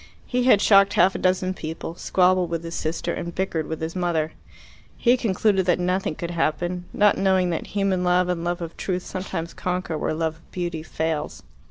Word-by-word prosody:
He 250 0 0
had 210 -6 +5
shocked 200 -1 +6
half 185 +2 +4
a - - -4
dozen 185 0 +1
people, 160 -1 -6
squabbled 180 0 +2
with 165 0 -3
his 165 0 -6
sister, 160 0 -2
and 170 0 -5
bickered 170 -4 -1
with 160 - -4
his 160 +2 -4
mother. 170 -3 0 0.7
He 240 +1 +4
concluded 200 -4 +1
that 175 - +3
nothing 180 -2 0
could 170 +2 -5
happen, 175 +2 -1
not 205 0 +3
knowing 190 -2 +2
that 165 - -3
human 195 -2 +1
love 180 0 +3
and 175 -2 -2
love 175 0 -2
of 165 - -7
truth 185 -2 -2
sometimes 175 -3 -5
conquer 180 -3 -3
where 155 - -1
love 160 0 -1
of 165 - -26
beauty 175 -3 -3
fails. 160 -1 -3
180 Hz, 195 wpm, -24 LUFS, 165-185 Hz, 0.7 s, shocked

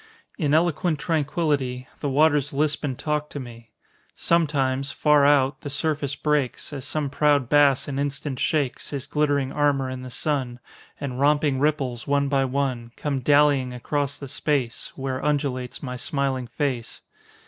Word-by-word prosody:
In 150 -5 +1
eloquent 170 0 +2
tranquility 145 -5 -1
The 145 - -2
waters 145 0 +3
lisp 150 +2 +1
and 135 -4 -2
talk 150 -1 -2
to 145 - -6
me. 115 -3 -10 0.5
Sometimes, 140 -5 +1
far 150 -2 +4
out, 140 -1 +3
the 145 - -5
surface 145 -1 -1
breaks, 150 -1 -1
As 135 -3 -5
some 150 -3 -2
proud 145 -3 +2
bass 140 -2 +4
an 140 -1 -3
instant 140 -1 -3
shakes 145 -5 -1
His 140 -2 -4
glittering 145 -2 0
armor 140 -3 +1
in 130 0 -6
the 130 - -7
sun, 125 -2 -2 0.4
And 130 -3 -4
romping 145 -1 +3
ripples, 135 -5 0
one 140 0 +2
by 135 -1 +2
one, 130 -3 -2
Come 140 -3 -2
dallyiong 140 -2 +3
across 140 +2 -2
the 140 - -8
space 135 -3 -1
Where 130 -1 -3
undulates 140 -4 -1
my 125 -2 -4
smiling 135 -1 -1
face. 130 -3 -3
140 Hz, 155 wpm, -24 LUFS, 130-150 Hz, 0.5 s, far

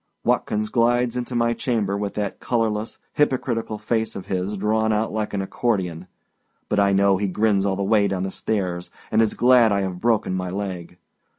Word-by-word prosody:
Watkins 105 0 0
glides 120 +1 +2
into 125 0 -3
my 115 0 +2
chamber, 110 -5 -1
with 100 0 -3
that 105 -2 -3
colorless, 110 -2 -1 0.2
hypocritical 125 -6 0
face 110 +1 -1
of 95 - -6
his 95 +2 -2
drawn 110 +2 +1
out 110 +1 +1
long - - -9
like 110 -1 -2
an 95 - -1
accordion; 95 -5 -2 0.6
but 105 - +1
I 100 0 +4
know 100 0 +4
he 100 +1 -1
grins 100 +1 +1
all 95 - 0
the 100 - -2
way 100 0 +3
down 95 -1 -2
stairs, 90 -5 -2 0.2
and 110 - +4
is 110 - +1
glad 120 -2 +5
I 100 0 +2
have 90 -2 -4
broken 115 -5 +1
my 90 -1 -2
leg. 90 -3 -5
105 Hz, 190 wpm, -23 LUFS, 95-115 Hz, 0.6 s, glad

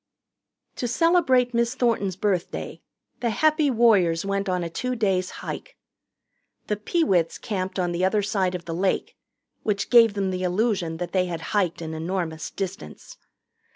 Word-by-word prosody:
To 245 - -2
celebrate 260 -4 +3
Miss 235 +2 +1
Thornton's 225 -7 +1
birthday 190 -2 -2 0.4
the 240 - 0
Happy 310 +4 +2
Warriors 200 -9 +3
went 200 0 -1
on 180 -1 0
a - - -2
two 250 +9 -3
days' 190 -5 +1 0.2
hike. - - -7 0.9
The 210 - -1
Peewits 205 - +1
camped 190 -3 -4
on 175 -2 0
the 175 +1 -1
other 205 +2 +2
side 190 -3 0
of 175 - -6
the 165 - -4
Lake, 185 +3 -1 0.5
which 200 -1 -2
gave 230 -3 +7
them 195 -2 0
the 185 0 -3
illusion 185 -3 0
they 180 +2 0
had 170 -2 -4
hiked 180 -5 0
an 160 0 -5
enormous 160 -1 -3
distance. 195 0 -7
195 Hz, 155 wpm, -24 LUFS, 180-235 Hz, 0.9 s, gave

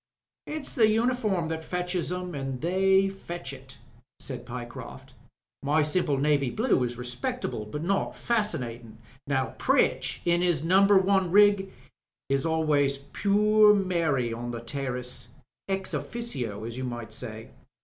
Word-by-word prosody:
''It's 305 -2 -2
the 220 -3 +5
uniform 220 -6 +1
that 160 0 -3
fetches 180 0 -2
'em, 180 -1 -4
an' 135 -3 -4
they 190 +4 +3
fetch 175 -6 -7
it," 130 -1 -12 0.4
said 130 -3 -7
Pyecroft. 125 +2 -8 0.5
"My 150 +2 +2
simple 150 -2 +1
navy 140 -1 +2
blue 220 - +1
is 120 -1 -3
respectable, 125 - -3
but 150 +8 -5
not 195 +3 0
fasdnatin'. 125 - -2 0.3
Now 135 -2 0
Pritch - - +2
in 175 0 +3
'is 175 -5 +1
Number 195 +4 +5
One 190 -1 +3
rig 200 0 +5 0.6
is 135 +3 +1
always 150 -4 +2
'purr 210 +7 +4
Mary, 165 - 0
on 120 +1 -5
the 120 -1 -5
terrace' 125 0 -4 0.4
ea: 195 - +2
ojfUno 135 - -4
as 120 +2 -6
you - - -3
might 120 -3 -5
say." 110 -1 -7
160 Hz, 140 wpm, -27 LUFS, 130-195 Hz, 0.6 s, the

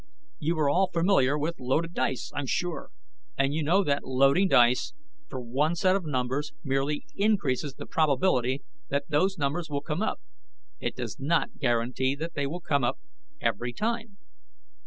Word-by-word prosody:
"You 160 +2 0
are 150 -2 +2
all 180 +6 +3
familiar 165 -6 +3
with 160 +3 -2
loaded 155 +7 0
dice, 130 -3 -1
I'm 145 -2 -3
sure. 175 +6 -2 0.5
And 135 +1 +2
you 160 - 0
know 175 +7 +3
that 145 -4 0
loading 135 +8 +3
dice 125 - +4 0.3
for 130 - -6
one 135 +7 0
set 185 +2 +3
of 195 -3 -2
numbers 140 +2 -1
merely 135 +2 -1
increases 155 - 0
the - - -8
probability 140 -3 +1 0.3
that 140 +1 -1
those 190 +6 +2
numbers 155 +3 -1
will 140 -1 -2
come 155 +4 -2
up; 220 - -1 0.6
it - - -3
does - - -5
not 155 +5 0
guarantee 125 +1 +1
that 165 +3 -5
they 145 -2 -1
will 175 +5 -5
come 140 -5 +1
up 120 - +1 0.4
every 120 0 -1
time. 225 - -3
145 Hz, 165 wpm, -28 LUFS, 135-170 Hz, 0.6 s, dice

